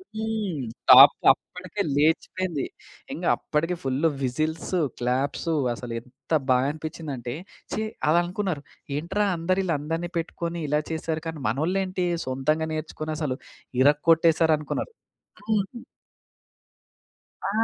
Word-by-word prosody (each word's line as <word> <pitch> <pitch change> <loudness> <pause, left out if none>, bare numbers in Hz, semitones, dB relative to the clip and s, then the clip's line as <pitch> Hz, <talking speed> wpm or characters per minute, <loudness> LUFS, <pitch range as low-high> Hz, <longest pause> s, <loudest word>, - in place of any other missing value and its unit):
హ్మ్! 220 - -3 0.3
టాప్ 130 +2 +11 0.2
అప్పటికే 180 +7 -6
లేచిపోయింది. 160 +1 +1 0.5
ఇంగ - - -5
అప్పటికే 165 +4 -1
ఫుల్ 135 +4 +1 0.2
విసిల్సూ, 155 +7 -1 0.2
క్లాప్సూ 135 +6 0 0.2
అసలు 120 0 -7
ఎంత 130 +5 -12 0.2
బా 125 - +6
అనిపించిందంటే 150 -5 -5 0.4
ఛీ! - - -1 0.3
అలా 165 - +5
అనుకున్నారు. 180 -5 -2 0.4
ఏంట్రా! 190 +6 0
అందరు 185 +3 +1
ఈళ్ళందరిని 165 +1 -2
పెట్టుకొని 170 0 -4
ఇలా 150 +1 +2
చేసారు. 160 0 -2
కానీ 160 -2 -4
మనోళ్ళు 155 - 0
ఏంటీ 185 -1 -2 0.2
సొంతంగా 155 +5 0
నేర్చుకొని 155 0 -4
అసలు 140 -5 -1 0.5
ఇరగోట్టేసారనుకున్నారు. 160 - +3 0.6
హ్మ్. 215 +3 -1 1.6
ఆ! - - 0
160 Hz, 105 wpm, -25 LUFS, 145-180 Hz, 1.6 s, టాప్